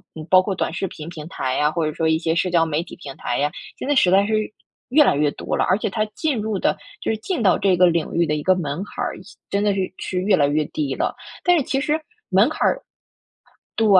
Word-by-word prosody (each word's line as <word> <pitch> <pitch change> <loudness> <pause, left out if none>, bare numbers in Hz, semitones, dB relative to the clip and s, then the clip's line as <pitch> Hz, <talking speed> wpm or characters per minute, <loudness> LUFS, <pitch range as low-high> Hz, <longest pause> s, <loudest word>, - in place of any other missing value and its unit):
嗯， 155 -1 -7
包 185 0 +7
括 195 +1 -2
短 175 - -2
视 190 +2 -2
频 155 -2 -9
平 155 -3 -8
台 130 -5 -2
呀， 150 +1 +2
或 165 0 -1
者 155 - -2
说 160 - 0
一 160 0 +3
些 160 0 -1
社 180 +2 +1
交 170 -2 +3
媒 160 0 -1
体 - - -11
平 140 -4 -8
台 120 - -2
呀， 145 +1 +1 0.3
现 - - -5
在 290 - +2
实 180 -8 +4
在 195 +1 +5
是 220 - -1 0.6
越 300 +4 +6
来 - - +3
越 145 0 +2
多 - - -4
了。 - - +2
而 185 - +3
且 - - -2
它 215 -1 0
进 300 -6 0
入 215 -2 -2
的 - - +1 0.2
就 - - 0
是 220 - -1
进 330 - -3
到 190 -5 +4
这 190 -3 +2
个 180 0 +6
领 170 -2 0
域 170 - +2
的 150 - 0
一 150 - -3
个 185 0 +4
门 160 0 -3
槛 205 - -5
儿， - - -3
趋 - - -16
真 200 +1 0
的 205 -1 +3
是 195 - -2 0.2
趋 185 - -3
于 - - -3
越 205 -1 +5
来 145 -5 +3
越 150 +1 +1
低 140 -2 -3
了。 - - -1 0.3
但 355 -1 +4
是 300 - +1
其 270 - -1
实 300 +3 0 0.3
门 200 +8 +4
槛 - - 0
儿 - - 0 1.0
对， 225 - +3
180 Hz, 300 characters per minute, -22 LUFS, 155-215 Hz, 1.0 s, 包